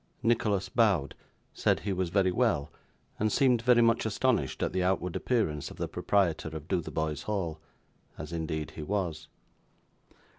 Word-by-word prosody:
Nicholas 110 -4 +1
bowed, 100 - +2 0.4
said - - +1
he 100 - -2
was 90 -1 -1
very 95 0 +2
well, 90 - +1 0.5
and 110 0 +1
seemed 125 -2 +3
very 120 0 +5
much 115 0 +3
astonished 110 - 0
at - - -1
the 95 - 0
outward 90 -1 0
appearance 80 - 0
of - - -12
the - - -2
proprietor 90 -6 0
of 75 0 -11
Dotheboys 80 -3 -2
Hall: 90 -7 -2 0.6
as 75 +2 -7
indeed 80 -2 -3
he - - -8
was. 90 -2 -2
95 Hz, 150 wpm, -29 LUFS, 80-110 Hz, 0.6 s, very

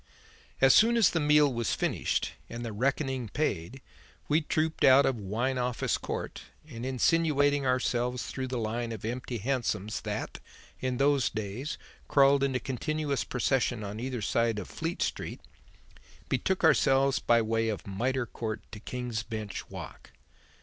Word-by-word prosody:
As 135 -1 +7
soon 235 +2 +5
as 220 -6 +5
the 165 - 0
meal 150 -2 +4
was 115 -2 -1
finished - - -1 0.2
and 120 0 -6
the 115 - -4
reckoning 130 +1 -1
paid, 130 - -2 0.4
we 155 +2 +3
trooped 155 +1 -1
out 135 +1 +7
of 135 - +1
Wine 115 +5 -2
Office 125 -1 0
Court, - - -5 0.3
and, 120 -6 -8
insinuating 145 +1 +2
ourselves 125 -1 0
through 130 -1 -4
the 125 0 -3
line 115 +1 -2
of 110 -1 -7
empty 120 +1 -3
hansoms 110 -3 -2
that, - - -4 0.4
in 130 -1 -2
those 140 -2 +3
days, 110 +7 -4 0.3
crawled 140 0 +5
in 135 -1 +1
a - - +1
continuous 140 +3 -2
procession 125 -2 0
on 105 +2 -5
either 125 -2 -3
side 115 +1 +1
of 105 - -5
Fleet 165 +2 -3
Street, - - -4 0.9
betook 190 -2 0
ourselves 135 -4 +4
by 120 0 +4
way 115 0 0
of 105 - -4
Mitre 120 +6 -1
Court 110 -1 -5
to 105 - -8
King's 120 -1 -4
Bench 110 -3 -6
Walk. - - -10
125 Hz, 155 wpm, -29 LUFS, 115-140 Hz, 0.9 s, As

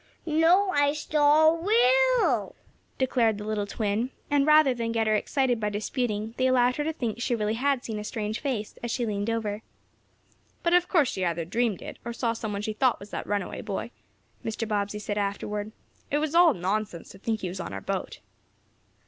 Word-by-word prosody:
"No, 335 +5 +4
I 285 -3 +3
saw 300 +1 +4
Will!" 480 +7 +3 0.4
declared 240 -5 +2
the 210 - -6
little 210 -1 -2
twin, 215 +3 -1 0.2
and, 290 0 +3
rather 305 -3 +6
than 230 -1 -3
get 225 -1 +1
her 215 - +2
excited 250 +2 +1
by 210 -1 0
disputing, 215 +1 -2
they 260 - +2
allowed 250 -1 +3
her 295 - 0
to 320 - -1
think 240 -7 -4
she 240 - +1
really 215 -1 -1
had 265 +2 0
seen 220 -2 -4
a - - -5
strange 210 0 -3
face, 245 -8 -4
as 235 - -4
she 240 +1 -1
leaned 205 0 -2
over. 220 -2 -2 1.0
"But 340 - +2
of 355 0 +4
course 315 -10 +3
she 190 - -3
either 170 -1 -1
dreamed 225 +1 -1
it, - - -8
or 235 - -5
saw 235 -1 -1
some 225 -2 -5
one 200 0 -3
she 215 - -2
thought 250 +2 +2
was 205 +1 -12
that - - -5
runaway 205 -2 -2
boy," 215 +3 -4 0.5
Mr. 225 0 -3
Bobbsey 205 -1 -1
said, 210 0 -3
afterward. 205 +1 -3 0.4
"It's 300 +1 0
all 340 -1 +6
nonsense 190 -1 -3
to 195 - -13
think 220 +1 -2
he 185 - -3
was 180 +2 -6
on - - -5
our 95 - -4
boat." - - -4
230 Hz, 200 wpm, -27 LUFS, 210-285 Hz, 1.0 s, rather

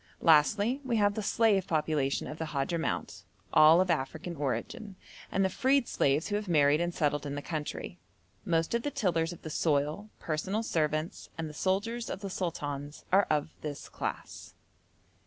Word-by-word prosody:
Lastly, 205 - +4
we 240 -3 0
have 205 -1 +3
the 215 - -3
slave 205 -2 +2
population 150 -3 0
of 150 - -7
the 160 - -2
Hadhramout, 155 +3 -2 0.3
all 155 +3 +8
of 185 -1 +2
African 160 +3 -3
origin, 190 - -3 0.4
and 195 - +2
the - - +4
freed 265 +5 +2
slaves 140 +6 +1
who 205 - 0
have 210 -1 -5
married 150 -2 +4
and 175 0 0
settled 145 -3 0
in 140 -1 -4
the 145 - -4
country. 155 +2 -5 0.4
Most 165 -3 0
of 235 - +1
the 290 - -2
tillers 165 - 0
of 175 - -11
the 155 - -6
soil, 150 +7 0
personal 190 +8 -2
servants, 155 -3 -1
and 165 -1 -3
the 150 - -8
soldiers 210 +8 -1
of - - -5
the 195 -2 -5
sultans 145 -5 -4
are 195 +2 +5
of 150 0 +1
this 145 -2 -6
class. - - -6
165 Hz, 175 wpm, -30 LUFS, 150-200 Hz, 0.4 s, all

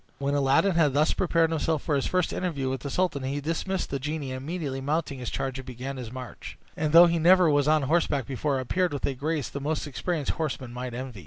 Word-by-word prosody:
When 140 0 -1
Aladdin 140 +7 +3
had 160 -5 +3
thus 150 +2 +3
prepared 165 -2 +2
himself 160 -1 0
for 150 - 0
his 135 - 0
first 180 -2 0
interview 145 -8 -2
with 130 - -3
the 140 - -5
sultan, 180 -4 0
he 135 +2 -2
dismissed 165 +5 -2
the 140 - -1
genie, 150 -1 -4
and 130 0 -5
immediately 145 -4 -4
mounting 145 -1 -2
his 125 - -4
charger, 135 0 -3
began 130 +2 -6
his 120 -3 -7
march, 125 -1 -8 0.2
and 155 -1 -1
though 170 +2 +9
he 170 -1 +1
never 175 0 +6
was 145 0 +2
on 155 -1 +3
horseback 145 -3 +1
before, 135 +2 -1
appeared 175 +6 0
with 140 - -2
a 140 - -1
grace 150 +1 -2
the 140 - -6
most 155 +2 -2
experienced 150 +2 -2
horseman 135 -6 -4
might 125 -1 -5
envy. 125 -4 -6
145 Hz, 230 wpm, -27 LUFS, 135-165 Hz, 0.2 s, though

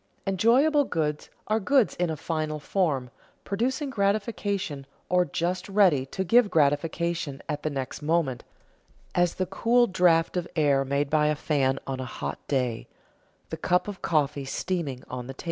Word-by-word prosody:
_ - - -43 0.2
Enjoyable 245 - +4
goods 150 - -2 0.2
are 215 +2 +1
goods 255 +2 +3
in 175 -1 0
a 160 - -3
final 155 -1 -3
form, 145 -8 -1 0.3
producing 260 +7 -1
gratification 200 - -1 0.2
or 180 0 +3
just 175 +5 -2
ready 185 -10 +3
to 190 +7 -3
give 230 +3 +4
gratification 155 -1 0 0.2
the 155 - -1
next 135 -1 -5
moment, 150 -5 0 0.7
as 175 -1 +2
the 185 - -1
cool 235 +6 +3
draft 175 -5 +3
of 180 -1 -1
air 145 -4 +3
made 140 +1 -1
by 150 -1 +3
a 150 - +2
fan 135 -3 +1
on 135 -1 -4
a 130 - -3
hot 125 - -5
day, 125 -5 -1 0.6
the - - -3
cup 180 +3 +1
of 205 -2 -7
coffee 145 -3 0
steaming 140 -2 -3
on 125 -1 -6
the 135 - -7
table. - - -34
165 Hz, 160 wpm, -26 LUFS, 140-195 Hz, 0.7 s, Enjoyable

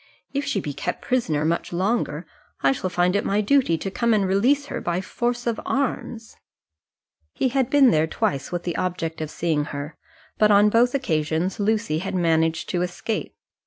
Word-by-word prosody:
"If 280 +1 -1
she 275 -8 0
be 150 -5 -4
kept - - -4
a - - -14
prisoner 160 -13 +1
much 170 +1 -1
longer, 180 -3 -1 0.4
I 135 - +5
shall 185 +7 -2
find 180 +1 +1
it 205 - +1
my 200 - +1
duty 210 -5 +3
to 195 +5 -4
come 235 +2 +2
and 200 -2 +2
release 250 +10 +2
her - - -5
by 175 0 -1
force 240 +5 -2
of 235 -2 -1
arms." 240 -4 -3 1.0
He 260 - +1
had 260 -1 0
been 275 -3 +6
there 155 -2 +2
twice 140 -2 -2
with 175 -1 -3
the 175 - -3
object 165 -3 -3
of 155 - -3
seeing 155 -3 -1
her, 145 +1 -6 0.4
but 215 - +5
on 205 0 +6
both 240 +4 +3
occasions 165 - -1
Lucy 210 -6 0
had 190 +2 -4
managed 160 -2 +1
to 175 - 0
escape. 180 +5 -3
185 Hz, 190 wpm, -23 LUFS, 160-235 Hz, 1.0 s, been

